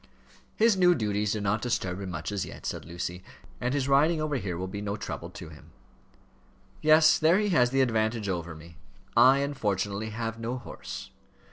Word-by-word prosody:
"His 225 Hz, -1 st, +4 dB
new 180 Hz, -2 st, +5 dB
duties 105 Hz, -3 st, 0 dB
do 105 Hz, -, -3 dB
not 100 Hz, +2 st, 0 dB
disturb 95 Hz, -6 st, -2 dB
him 95 Hz, -, -5 dB
much 85 Hz, +1 st, -5 dB
as 100 Hz, -2 st, -2 dB
yet," -, -, -9 dB
said -, -, -4 dB
Lucy. 85 Hz, +2 st, -5 dB, 0.4 s
"And 125 Hz, 0 st, -1 dB
his 135 Hz, -2 st, 0 dB
riding 150 Hz, +4 st, +3 dB
over 155 Hz, -2 st, -1 dB
here 90 Hz, -8 st, -4 dB
will 90 Hz, -, -3 dB
be 100 Hz, +2 st, -6 dB
no 100 Hz, 0 st, -3 dB
trouble -, -, -6 dB
to -, -, -10 dB
him." 75 Hz, -2 st, -15 dB, 1.1 s
"Yes; 155 Hz, 0 st, +6 dB
there 165 Hz, +3 st, +4 dB
he 210 Hz, 0 st, +1 dB
has 125 Hz, -9 st, +4 dB
the 135 Hz, +1 st, +2 dB
advantage 110 Hz, -3 st, 0 dB
over 85 Hz, -3 st, -3 dB
me. 80 Hz, +1 st, -14 dB, 0.4 s
I 135 Hz, +2 st, +6 dB
unfortunately 105 Hz, -6 st, -2 dB
have 115 Hz, +1 st, -4 dB
no 120 Hz, +3 st, -3 dB
horse." -, -, -8 dB
110 Hz, 190 wpm, -28 LUFS, 95-140 Hz, 1.1 s, Yes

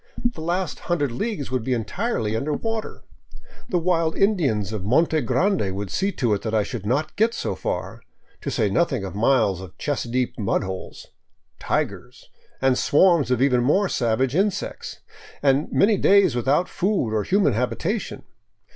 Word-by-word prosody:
The 160 Hz, -, -9 dB
last 175 Hz, +3 st, -2 dB
hundred 145 Hz, -7 st, +1 dB
leagues 150 Hz, -, -3 dB
would 130 Hz, -3 st, -1 dB
be 130 Hz, -, 0 dB
entirely 115 Hz, -, -2 dB
under 140 Hz, +7 st, -1 dB
water; 225 Hz, +6 st, -4 dB, 0.7 s
the 180 Hz, -, +1 dB
wild 165 Hz, -2 st, +1 dB
Indians 135 Hz, -, +1 dB
of 105 Hz, -, -3 dB
the 95 Hz, -, -6 dB
Monte 160 Hz, +4 st, +3 dB
Grande 155 Hz, -, 0 dB
would 100 Hz, 0 st, -5 dB
see 195 Hz, +2 st, 0 dB
to 120 Hz, -5 st, 0 dB
it 100 Hz, -, -1 dB
that 110 Hz, -1 st, -2 dB
I 105 Hz, -, +3 dB
should 105 Hz, -3 st, -6 dB
not 140 Hz, +7 st, -1 dB
get 225 Hz, +3 st, +2 dB
so -, -, -2 dB
far, -, -, -4 dB, 0.4 s
to -, -, -3 dB
say 105 Hz, -, +1 dB
nothing 115 Hz, -, 0 dB
of 95 Hz, -, -6 dB
miles 110 Hz, -4 st, +2 dB
of 95 Hz, 0 st, -11 dB
chest 145 Hz, -5 st, -2 dB
deep 125 Hz, -1 st, -1 dB
mud 100 Hz, -, 0 dB
holes, 95 Hz, -1 st, -7 dB, 0.3 s
" -, -, -49 dB
tigers," -, -, -3 dB, 0.3 s
and 130 Hz, -1 st, +3 dB
swarms 165 Hz, -3 st, +4 dB
of 125 Hz, 0 st, +2 dB
even 125 Hz, -3 st, +3 dB
more 190 Hz, +11 st, +2 dB
savage 125 Hz, 0 st, 0 dB
insects, 195 Hz, +1 st, -2 dB, 0.4 s
and 140 Hz, +2 st, +2 dB
many 205 Hz, +1 st, +3 dB
days 195 Hz, -8 st, +4 dB
without 135 Hz, +8 st, +1 dB
food 185 Hz, -, -1 dB
or 110 Hz, -, +1 dB
human 195 Hz, -, +2 dB
habitation. 165 Hz, -, -2 dB
135 Hz, 175 wpm, -23 LUFS, 110-180 Hz, 0.7 s, swarms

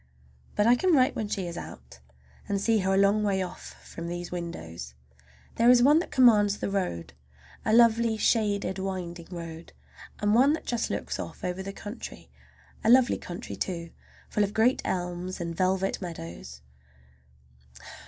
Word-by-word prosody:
But 210 Hz, -, +2 dB
I 240 Hz, +2 st, +6 dB
can 365 Hz, +7 st, +2 dB
write 255 Hz, -2 st, +3 dB
when 215 Hz, -, -2 dB
she 195 Hz, -2 st, -3 dB
is 170 Hz, 0 st, -5 dB
out, -, -, -11 dB, 0.5 s
and 200 Hz, -1 st, 0 dB
see 225 Hz, +2 st, +2 dB
her 190 Hz, 0 st, +1 dB
a -, -, +2 dB
long 200 Hz, +2 st, +4 dB
way 195 Hz, -2 st, +1 dB
off 180 Hz, 0 st, -9 dB
from 170 Hz, 0 st, -7 dB
these 175 Hz, 0 st, -5 dB
windows. 80 Hz, -, -6 dB, 0.6 s
There 235 Hz, +1 st, +5 dB
is 245 Hz, -1 st, +7 dB
one 295 Hz, +4 st, +6 dB
that 345 Hz, -, -4 dB
commands 210 Hz, -5 st, +5 dB
the -, -, -3 dB
road, 130 Hz, -, -3 dB, 0.5 s
a -, -, 0 dB
lovely, 230 Hz, -1 st, +4 dB
shaded, 205 Hz, -4 st, +1 dB
winding 180 Hz, -3 st, -5 dB
road, 165 Hz, -2 st, -8 dB, 0.5 s
and 205 Hz, 0 st, +2 dB
one 265 Hz, +6 st, +5 dB
that 320 Hz, -, -4 dB
just 240 Hz, -2 st, -1 dB
looks -, -, -3 dB
off -, -, -7 dB
over 180 Hz, +1 st, -3 dB
the 195 Hz, +1 st, -5 dB
country. 205 Hz, +3 st, -9 dB, 0.5 s
A 220 Hz, -, +2 dB
lovely 250 Hz, 0 st, +5 dB
country, 180 Hz, +6 st, -7 dB
too, 170 Hz, -3 st, -4 dB, 0.4 s
full 210 Hz, -, +1 dB
of 205 Hz, +1 st, -3 dB
great 235 Hz, +4 st, +3 dB
elms 180 Hz, +1 st, -3 dB
and 170 Hz, -1 st, -4 dB
velvet 190 Hz, +2 st, 0 dB
meadows. 80 Hz, -, -8 dB
195 Hz, 165 wpm, -27 LUFS, 175-225 Hz, 0.6 s, is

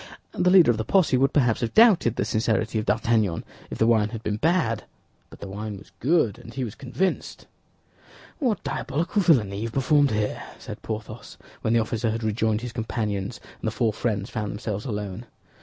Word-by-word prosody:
The 180 Hz, -, +2 dB
leader 180 Hz, -8 st, +7 dB
of 115 Hz, -, -2 dB
the 110 Hz, -, -1 dB
posse 170 Hz, -, +3 dB
would 135 Hz, +2 st, +3 dB
perhaps 125 Hz, -6 st, +2 dB
have 115 Hz, -, -2 dB
doubted 210 Hz, -, +6 dB
the -, -, -1 dB
sincerity 110 Hz, +1 st, 0 dB
of 110 Hz, -, -5 dB
D'Artagnan 110 Hz, -6 st, +1 dB, 0.3 s
if -, -, -6 dB
the 110 Hz, -, +3 dB
wine 110 Hz, -2 st, +3 dB
had 115 Hz, -1 st, -7 dB
been 105 Hz, -, -1 dB
bad; 140 Hz, -, +1 dB, 0.4 s
but -, -, -15 dB
the -, -, -6 dB
wine 105 Hz, +1 st, -5 dB
was -, -, -15 dB
good, 135 Hz, -, +2 dB
and 115 Hz, -, -11 dB
he 135 Hz, -, -2 dB
was 110 Hz, -4 st, -4 dB
convinced. 155 Hz, +11 st, -3 dB, 0.9 s
"What 245 Hz, -8 st, 0 dB
diabolical 170 Hz, +9 st, -1 dB
villainy 115 Hz, -, +3 dB
you 105 Hz, -, -3 dB
have 115 Hz, -, -5 dB
performed 145 Hz, +1 st, +3 dB
here," 105 Hz, -2 st, -1 dB, 0.2 s
said -, -, -9 dB
Porthos, 110 Hz, +1 st, -7 dB, 0.2 s
when 110 Hz, -, +1 dB
the 115 Hz, -, +4 dB
officer 115 Hz, +1 st, -1 dB
had 115 Hz, +1 st, -2 dB
rejoined 110 Hz, 0 st, 0 dB
his 120 Hz, -1 st, -6 dB
companions 110 Hz, -2 st, -3 dB, 0.2 s
and -, -, -4 dB
the -, -, +1 dB
four 110 Hz, -1 st, 0 dB
friends 105 Hz, -2 st, -2 dB
found 105 Hz, -3 st, -3 dB
themselves 105 Hz, +1 st, -4 dB
alone. 105 Hz, -1 st, -5 dB
115 Hz, 195 wpm, -25 LUFS, 105-135 Hz, 0.9 s, leader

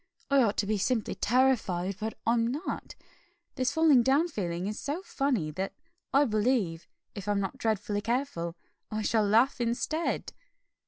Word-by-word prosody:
I 280 Hz, -1 st, +6 dB
ought 215 Hz, -4 st, +1 dB
to -, -, +1 dB
be 210 Hz, 0 st, 0 dB
simply 225 Hz, +2 st, 0 dB
terrified, 210 Hz, -7 st, +1 dB
but 220 Hz, 0 st, -3 dB
I'm 230 Hz, 0 st, +3 dB
not. 285 Hz, +9 st, -4 dB, 0.6 s
This 255 Hz, +1 st, 0 dB
falling 305 Hz, -4 st, +5 dB
down 280 Hz, +8 st, +3 dB
feeling 175 Hz, -, -3 dB
is 210 Hz, +2 st, -3 dB
so 300 Hz, +7 st, -3 dB
funny, 250 Hz, -, -1 dB
that 190 Hz, +5 st, -3 dB, 0.4 s
I 280 Hz, +2 st, +5 dB
believe, 215 Hz, -, 0 dB, 0.3 s
if 200 Hz, -1 st, -8 dB
I'm 205 Hz, -1 st, +1 dB
not 195 Hz, -2 st, -3 dB
dreadfully 210 Hz, -2 st, -1 dB
careful, 225 Hz, -9 st, -2 dB, 0.3 s
I 215 Hz, 0 st, -2 dB
shall 220 Hz, +1 st, +2 dB
laugh 230 Hz, +5 st, +3 dB
instead." 245 Hz, +8 st, -1 dB
225 Hz, 155 wpm, -29 LUFS, 200-265 Hz, 0.6 s, I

